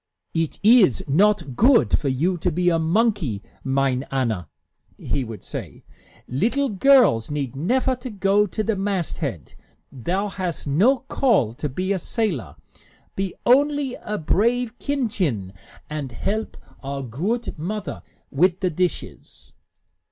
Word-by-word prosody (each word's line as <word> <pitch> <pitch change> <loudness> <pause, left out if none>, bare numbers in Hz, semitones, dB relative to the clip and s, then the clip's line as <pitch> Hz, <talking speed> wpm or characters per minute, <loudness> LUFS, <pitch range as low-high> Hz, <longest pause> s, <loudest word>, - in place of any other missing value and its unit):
"It 165 -2 -1
iss 210 - +5
not 180 -2 +2
goodt 230 - +4
for 145 - -3
you 160 +8 +1
to 180 - 0
be 180 +2 +2
a 165 -1 +2
monkey, 165 - +1 0.2
mine 135 -1 +1
Anna," 115 - -1 0.5
he 135 - -2
would 110 -3 -8
say. - - -7 0.4
"Little 240 - 0
girls 215 - +4
need 140 -3 -3
nefer 255 - +1
to 250 +1 -7
go 205 0 +2
to 215 +4 -3
the 220 0 0
masthead. 170 - -3 0.4
Thou 180 - -2
hast 185 -3 -4
no 195 - +3
call 235 - +1
to 150 +5 -4
be 185 +8 -1
a 190 - -1
sailor. 165 - -2 0.6
Be 195 -2 -3
only 285 +1 +3
a 210 -3 -5
brave 235 +8 0
kindchen, 190 - -1 0.3
and 150 -4 -5
help 210 - -3 0.2
our 140 0 -4
goodt 180 - -3
mother 205 +5 -4 0.3
wit' 180 +6 +2
the 185 -2 +1
dishes." 180 +2 -4
180 Hz, 135 wpm, -23 LUFS, 135-220 Hz, 0.6 s, iss